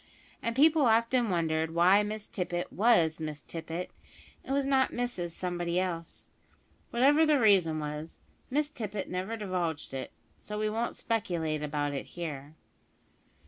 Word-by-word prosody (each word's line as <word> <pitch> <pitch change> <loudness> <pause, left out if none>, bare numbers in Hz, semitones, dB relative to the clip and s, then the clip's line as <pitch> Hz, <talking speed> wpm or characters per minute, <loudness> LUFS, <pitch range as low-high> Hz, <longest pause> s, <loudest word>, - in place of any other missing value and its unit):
And 230 0 -2
people 310 +3 +5
often 230 +1 +3
wondered 160 -2 0
why 185 +4 +6
Miss 210 0 -4
Tippet 175 -2 -3
was 180 -8 +3
Miss 155 -2 -5
Tippet 165 +2 -5 0.5
and - - -7
was 275 0 +1
not 270 -1 +3
Mrs 240 -8 -2
Somebody 175 0 -2
else. 170 -3 -4 0.6
Whatever 280 +6 +4
the 305 -3 +4
reason 190 -8 +4
was, 150 +1 -5 0.3
Miss 295 +2 0
Tippet 210 -7 -5
never 190 +5 -3
divulged 180 -9 -3
it, 130 -1 -5 0.3
so 210 - -6
we 215 0 0
won't 230 +2 -2
speculate 170 -9 -1
about 145 -1 -1
it 140 - -4
here. 150 -3 -5
185 Hz, 145 wpm, -30 LUFS, 160-230 Hz, 0.6 s, why